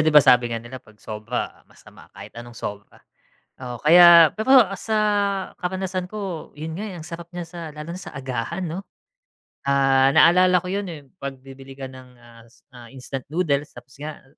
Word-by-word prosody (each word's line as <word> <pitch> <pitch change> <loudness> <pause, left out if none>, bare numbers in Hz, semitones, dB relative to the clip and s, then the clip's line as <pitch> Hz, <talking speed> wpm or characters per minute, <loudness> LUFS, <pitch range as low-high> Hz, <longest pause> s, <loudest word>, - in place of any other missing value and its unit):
'di 155 - +3
ba 150 -2 +7
sabi 125 -3 +5
nga 115 - -3
nila 120 +3 -9
'pag 110 -4 -21
sobra 110 +3 -5
masama - - -18
kahit 100 +2 -11
anong 120 -1 -12
sobra. 100 0 -8 0.6
Oo, 125 -2 -6
kaya 170 +1 +8
pero 245 0 +5
sa 220 +3 -3 0.7
karanasan 185 0 -3
ko 195 -6 -6
'yun 160 +1 -5
nga, 200 - -5
eh, 185 - -8
ang 160 - -9
sarap 170 0 -9
niya 175 -1 -6
sa 170 +1 -10
lalo 155 +3 -8
na 185 - -9
sa - - -9
agahan 135 +6 -4
'no? 165 +4 -4 0.9
Ah, 135 -1 +4
naalala 180 +5 +5
ko 180 - -4
'yun, 200 -1 -2
eh, 155 -4 -8 0.2
'pag 140 -1 -5
bibili 135 0 -13
ka 135 - -7
ng, 130 -1 -13
ah, 120 -1 -17
is 120 - -24 0.2
ah, 120 -2 -13
instant 130 0 -8
noodles 150 -3 0
tapos 125 +2 -14
nga 155 +1 -8
145 Hz, 190 wpm, -23 LUFS, 130-175 Hz, 0.9 s, kaya